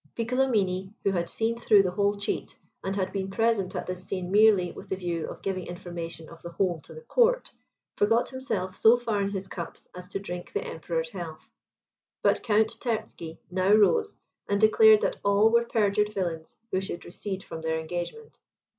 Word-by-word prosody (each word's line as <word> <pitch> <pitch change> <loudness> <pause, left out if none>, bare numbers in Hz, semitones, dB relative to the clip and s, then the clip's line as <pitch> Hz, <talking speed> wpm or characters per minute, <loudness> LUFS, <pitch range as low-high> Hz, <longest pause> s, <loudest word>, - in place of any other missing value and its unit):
Piccolomini, 215 -6 0
who 195 - +2
had 175 -2 -1
seen 230 +1 -1
through 210 -4 +5
the 185 - -1
whole 200 +2 +1
cheat, 205 +1 -4 0.3
and 195 +1 -2
had 190 -2 -1
been 195 -1 -2
present 215 -2 +1
at - - -3
this 185 0 -5
scene 185 -1 -4
merely 205 -4 +5
with - - -11
the - - 0
view 175 -3 -3
of - - -10
giving 185 -2 -3
information 170 -2 -7
of 165 0 -13
the 170 - -7
whole 175 -2 -1
to - - -16
the 475 - -9
court, - - +2 0.5
forgot 225 +4 +3
himself 205 -8 -3
so 225 +4 +6
far 225 -4 -1
in 195 - 0
his 195 -1 -4
cups 170 -3 -8
as 180 0 -9
to 195 - -4
drink 180 -3 -7
the 420 - -1
Emperor's - - -3
health. - - -7 0.8
But - - +3
Count 220 -1 +1
Terzky 190 -8 -4
now 185 +2 +3
rose, 430 - +4 0.3
and 200 0 +2
declared 220 0 +7
that - - 0
all 200 +2 +4
were 235 0 +4
perjured 210 -2 +1
villains 170 -6 -4 0.2
who 185 - +1
should 185 -2 -6
recede 190 +2 -6
from 160 - -7
their 160 0 -1
engagement. 175 - -6
200 Hz, 190 wpm, -27 LUFS, 180-225 Hz, 0.8 s, declared